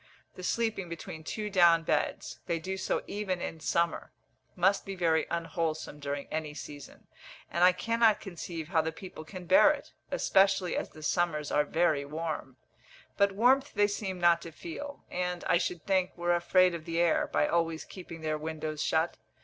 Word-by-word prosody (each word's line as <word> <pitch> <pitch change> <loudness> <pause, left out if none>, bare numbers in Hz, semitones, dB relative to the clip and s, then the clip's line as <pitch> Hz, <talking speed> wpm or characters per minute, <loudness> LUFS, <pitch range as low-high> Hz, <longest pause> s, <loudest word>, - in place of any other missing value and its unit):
The - - -10
sleeping 215 -1 -1
between 160 -1 -7
two 210 +5 -4
down 170 -3 +5
beds - - -1
they 170 - 0
do 185 +4 -4
so 190 - -1
even 195 -3 -3
in 165 - -5
summer 170 +1 0 0.4
must 190 +3 +3
be 195 -1 -6
very 165 -3 +2
unwholesome 165 -3 -3
during 140 0 -3
any 155 -2 -3
season; 145 -2 -10 0.5
and 170 - +1
I 180 - +8
cannot 230 +3 +2
conceive 170 -3 -6
how 165 -3 +3
the 160 +1 -2
people 170 -1 -9
can 180 +2 -9
bear 190 - +7
it, 300 -1 -3 0.2
especially 195 -2 +3
as - - -2
the 155 - -13
summers 155 -2 0
are 150 - +3
very 155 -2 +2
warm. 150 -3 -5 0.6
But 200 -1 +3
warmth 260 +7 +3
they 205 - +5
seem 195 -3 -4
not 170 -1 +4
to 165 - -8
feel; 285 - -8
and, 180 -1 -2
I 170 - +3
should 175 -2 -3
think, 185 -2 +1
were 175 0 +1
afraid 180 +1 +4
of 165 -2 -6
the 165 0 -2
air, 170 -2 +3
by - - +2
always 165 -1 0
keeping 170 -3 -10
their 155 -1 -1
windows 155 -1 -4
shut. 160 +2 +1
170 Hz, 180 wpm, -30 LUFS, 160-190 Hz, 0.6 s, I